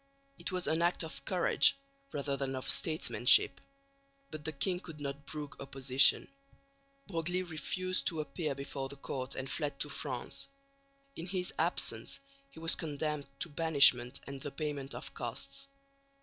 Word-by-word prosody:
It - - -2
was 180 -1 0
an 160 +1 +1
act 175 0 +3
of 160 - -7
courage 185 +8 +4 0.3
rather 140 -1 -2
than 135 -1 -3
of 130 - -5
statesmanship, 155 -5 +4 0.7
but 155 -1 -7
the 160 - -2
king 180 +5 -1
could 165 -5 -10
not 140 0 -6
brook 150 -2 -5
opposition. 135 -1 +4 0.8
Broglie 180 0 -2
refused 185 +2 -2
to 160 - -1
appear 150 0 -3
before 140 0 -5
the 140 - -6
court 130 -1 -4
and 135 0 -4
fled 145 0 -2
to 150 - -2
France. 135 -3 -2 0.7
In 170 - -6
his 180 -1 -1
absence - - +1 0.3
he 160 - -13
was 165 0 +3
condemned 150 -1 -2
to - - -1
banishment 140 -6 +5
and 140 -1 -7
the 145 - -4
payment 140 -1 -4
of - - -8
costs. 275 0 -5
150 Hz, 150 wpm, -33 LUFS, 140-165 Hz, 0.8 s, banishment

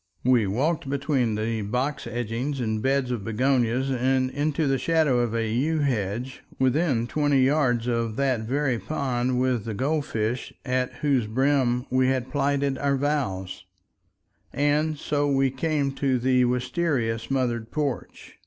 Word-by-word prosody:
We 125 -4 +3
walked 140 - -1
between 135 -5 0
the 110 +1 -2
box 125 +6 -2
edgings 120 +4 -3
and 110 -3 -1
beds 135 0 +1
of 120 -5 -3
begonias 125 +3 +1
and 130 0 +1
into 150 +2 0
the 135 -1 +1
shadow 155 -6 +2
of 120 -2 0
a 115 -1 0
yew 135 +9 0
hedge 120 -1 -2 0.2
within 130 -2 +2
twenty 145 +1 +2
yards 130 -4 +2
of 115 -2 -1
that 135 -2 +1
very 130 +2 -1
pond 125 -4 -1
with 125 -4 0
the 110 -2 -4
gold 145 +5 0
fish, 115 +3 -2
at 125 -1 0
whose 130 -6 +2
brim 125 +1 +1
we 130 0 +3
had 130 -1 -1
plighted 140 -1 0
our 140 -1 +1
vows, 130 -12 -2 0.9
and 150 +3 +1
so 145 0 0
we 135 -1 +2
came 140 0 0
to 135 -1 0
the 125 0 +3
wistaria 125 -1 0
smothered 120 -2 -2
porch. 145 -4 -4
130 Hz, 150 wpm, -25 LUFS, 120-140 Hz, 0.9 s, We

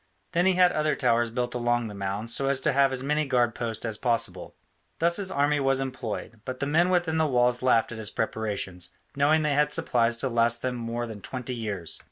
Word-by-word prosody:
Then 175 +1 +2
he 190 - +4
had 180 0 +5
other 155 0 0
towers 120 -3 +2
built 120 +1 -2
along 120 -1 0
the 105 - -8
mound, 100 +3 -3
so 135 +3 +2
as 140 -1 +2
to - - +1
have 135 0 +4
as 130 -1 -2
many 150 +2 +1
guard 120 -4 +1
posts 115 -1 -3
as 110 -2 -3
possible. 115 -7 -1 0.4
Thus 170 +1 +2
his 200 -2 -1
army 145 -3 +1
was 135 -1 +2
employed, 125 -4 -5
but 130 0 -6
the - - -1
men 165 +5 +3
within 175 -3 +1
the 160 - +3
walls 125 -2 +2
laughed 120 -3 +3
at 115 - -6
his 105 -2 -3
preparations, 95 -7 -3 0.3
knowing 150 +3 +3
they 150 -1 +1
had 150 +1 +2
supplies 115 -1 +1
to 130 - -1
last 120 -1 +1
them 130 -1 -1
more 120 0 -3
than 110 -3 -8
twenty 125 +3 -5
years. 105 -8 -4
125 Hz, 225 wpm, -26 LUFS, 115-145 Hz, 0.4 s, had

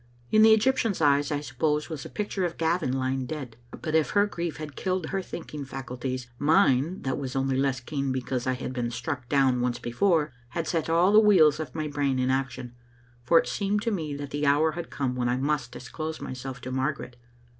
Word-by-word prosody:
In 215 - +6
the 220 0 +8
Egyptian's 225 -2 +3
eyes, 145 -1 +3
I 145 -1 -1
suppose, 150 +2 -1
was 155 -4 -6
a - - -7
picture 205 -2 -3
of 175 -1 -2
Gavin 165 -3 +1
lying 130 0 -1
dead; 135 -7 -6 0.3
but 155 - -2
if 160 -1 +3
her 205 0 +3
grief 170 -5 -4
had 150 -2 -7
killed 185 -2 -1
her 195 0 -1
think 175 -3 -8
ing 150 -1 -4
faculties, 130 -1 -5
mine, 155 0 +3
that 130 +1 -1
was 135 -2 -5
only 135 0 +1
less 135 -1 +1
keen 135 +1 -3
because 130 -1 -2
I 130 - +2
had 130 0 -5
been 120 -2 -2
struck 125 +1 -4
down 135 -3 +3
once 125 -1 0
before, 150 +4 +1 0.2
had 165 +6 -3
set 165 -1 -1
all 175 +4 +4
the 215 - +9
wheels 170 -9 +5
of 155 -4 -6
my 155 -1 -2
brain 145 -2 0
in 130 0 +1
action. 130 -2 -2 0.5
For 125 +8 +4
it - - +3
seemed 205 +1 -1
to 230 - 0
me 155 -7 -3
that 145 -1 -6
the 145 0 -1
hour 150 +3 +4
had 170 +1 -6
come 135 -3 -2
when 120 -1 0
I 125 - +1
must 135 -2 -1
disclose 155 +5 -6
myself 130 +1 -6
to 130 - -6
Margaret. 130 -1 -2
145 Hz, 220 wpm, -27 LUFS, 130-165 Hz, 0.5 s, the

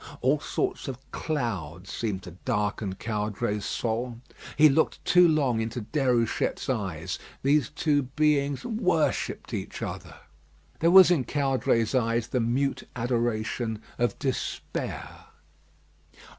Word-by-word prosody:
All - - +3
sorts 385 - -2
of 130 -3 -4
clouds 95 - -3
seemed 100 -5 -3
to 90 - -9
darken 105 -4 -1
Caudray's 105 -1 -2
soul. 120 +1 -2 0.4
He 155 +1 +8
looked 150 +2 +1
too 180 -1 +6
long 140 -8 +2
into 115 +2 -3
Déruchette's 125 0 0
eyes. 95 -7 -3 0.2
These 140 -1 +3
two 150 -1 +1
beings 140 0 +1
worshipped 185 -9 0
each - - -4
other. - - -6 0.6
There 165 - +4
was 185 0 +9
in 160 -7 +3
Caudray's 130 -5 +1
eye 115 -2 +2
the 125 +2 -2
mute 125 +4 0
adoration 115 -2 -1 0.2
of 120 -4 +1
despair. 130 -2 -4
125 Hz, 115 wpm, -27 LUFS, 110-145 Hz, 0.6 s, was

